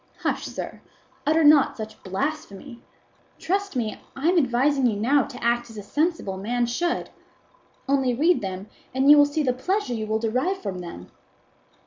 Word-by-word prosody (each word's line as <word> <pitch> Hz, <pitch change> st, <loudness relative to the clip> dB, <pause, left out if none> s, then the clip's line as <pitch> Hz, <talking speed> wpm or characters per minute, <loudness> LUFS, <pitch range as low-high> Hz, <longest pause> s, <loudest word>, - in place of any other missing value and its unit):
Hush, -, -, -1 dB
sir; -, -, -7 dB, 0.5 s
utter 315 Hz, +2 st, +4 dB
not 295 Hz, -2 st, +5 dB
such 220 Hz, -1 st, -8 dB
blasphemy; 235 Hz, +2 st, -5 dB, 0.6 s
trust 395 Hz, -1 st, -2 dB
me 220 Hz, -4 st, -3 dB
I 285 Hz, +5 st, +1 dB
am 360 Hz, -, +3 dB
advising 265 Hz, 0 st, +2 dB
you 220 Hz, -, 0 dB
now 265 Hz, +5 st, +3 dB
to -, -, -10 dB
act 240 Hz, 0 st, +1 dB
as 225 Hz, -, -11 dB
a 205 Hz, -, -6 dB
sensible 295 Hz, -, -1 dB
man 240 Hz, +5 st, -1 dB
should; 340 Hz, +9 st, -2 dB, 0.8 s
only 265 Hz, -3 st, +2 dB
read 330 Hz, +7 st, +3 dB
them, 190 Hz, 0 st, -5 dB, 0.3 s
and 270 Hz, +2 st, +5 dB
you -, -, +10 dB
will 290 Hz, -, +6 dB
see 295 Hz, +1 st, -1 dB
the 255 Hz, -3 st, +1 dB
pleasure 365 Hz, +2 st, -1 dB
you 220 Hz, -2 st, -3 dB
will 220 Hz, +1 st, +1 dB
derive 255 Hz, -, -1 dB
from 190 Hz, -3 st, -5 dB
them. 170 Hz, -, -9 dB
255 Hz, 170 wpm, -24 LUFS, 220-295 Hz, 0.8 s, you